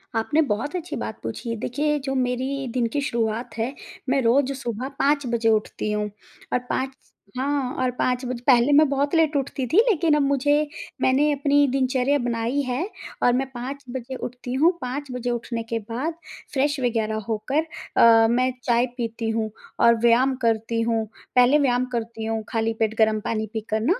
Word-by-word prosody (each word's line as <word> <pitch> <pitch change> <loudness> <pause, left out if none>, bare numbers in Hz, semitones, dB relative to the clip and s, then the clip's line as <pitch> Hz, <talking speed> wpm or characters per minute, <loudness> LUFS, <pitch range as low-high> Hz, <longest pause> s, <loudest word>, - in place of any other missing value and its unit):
आपने 260 +8 +2
बहुत 280 - -1
अच्छी 350 -1 -4
बात - - -5
पूछी। 230 -2 -4
देखिए, 295 +7 -1
जो 270 -1 -3
मेरी 260 +2 -1
दिन 245 -2 +1
की 285 - 0
शुरुआत 235 -3 -2
है, 230 +4 -1 0.4
मैं 270 +1 +3
रोज़ 260 +3 +3
सुबह 245 -2 -4
5 285 0 +2
बजे 230 -1 +2
उठती 215 -1 0
हूँ 210 0 -1 0.4
और - - +3
5 265 +1 -1 0.4
हाँ, 270 -1 -1
और 255 -1 +1
5 250 0 0
बज 250 -1 -3
पहले 250 +1 +5
मैं 305 +2 +6
बहुत 280 +1 0
लेट 320 -2 +3
उठती 275 -1 -1
थी, 320 - +1
लेकिन 335 -6 +3
अब 300 - +2
मुझे 290 +2 +2 0.3
मैंने 280 +3 +3
अपनी 285 0 +3
दिनचर्या 260 +1 +2
बनाई 240 +2 -1
है 275 +11 -2 0.3
और 245 - +5
मैं 265 +2 0
5 265 +3 -6
बजे 260 +1 -5
उठती 250 0 -6
हूँ। 310 +7 +4
5 265 +2 -4
बजे 250 -1 -3
उठने 235 -1 -3
के 230 0 -3
बाद 240 +9 -3 0.4
फ्रेश 285 +1 +1
वगैरह 225 -3 0
होकर 230 +7 0 0.4
अ, 225 -1 +7
मैं 255 +2 +2
चाय 240 0 +3
पीती 230 -1 -3
हूँ 225 -1 -1 0.3
और 235 0 +6
व्यायाम 245 +3 +4
करती 230 0 +1
हूँ, 225 -1 0 0.3
पहले 250 +3 +6
व्यायाम 250 -3 +2
करती 230 -1 -3
हूँ 225 0 -2
खाली 225 0 0
पेट 220 -1 +1
गर्म 220 -1 +3
पानी 220 -1 -1
पीकर 220 0 -2
ना। 330 - +1
250 Hz, 180 wpm, -24 LUFS, 230-280 Hz, 0.4 s, अ